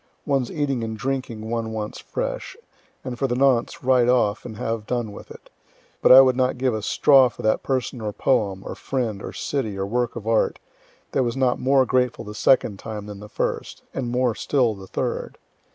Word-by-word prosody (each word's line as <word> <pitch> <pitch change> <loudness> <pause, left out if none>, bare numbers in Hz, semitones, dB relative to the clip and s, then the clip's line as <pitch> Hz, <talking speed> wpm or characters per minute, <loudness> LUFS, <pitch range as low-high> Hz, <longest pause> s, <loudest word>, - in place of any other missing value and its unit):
One's 135 -4 0
eating 140 -5 -1
and 110 -1 -4
drinking 125 -3 -3
one 115 -1 -3
wants 105 -1 -5
fresh, - - -4 0.5
and 125 -2 -6
for 135 - +1
the 120 - -1
nonce, 130 -2 +2
right 125 -2 +4
off, 110 -4 +2
and 110 -3 -7
have 115 -1 -3
done 120 -4 -2
with - - -11
it - - -14 0.5
but - - +5
I 130 +1 +11
would 130 -1 +4
not 130 0 +1
give 130 -1 +1
a 110 - -2
straw 130 +4 +5
for - - -11
that 110 - +2
person 130 -2 -2
or 105 -1 -2
poem, 100 -5 0
or - - -5
friend, 115 -7 -3
or - - -6
city, 115 -9 -3
or 95 - -1
work 120 +3 -1
of 115 -3 -7
art, 115 0 +1 0.5
that - - +1
was 120 0 -1
not 130 -2 +2
more 135 0 +3
grateful 125 -2 0
the 105 - -7
second 105 -2 +2
time 105 -2 -6
than 105 -1 -8
the 105 0 -10
first - - -3
and 125 -3 -3
more 125 -1 +1
still 125 -1 +1
the 95 -2 -11
third. - - -3
120 Hz, 205 wpm, -23 LUFS, 110-130 Hz, 0.5 s, I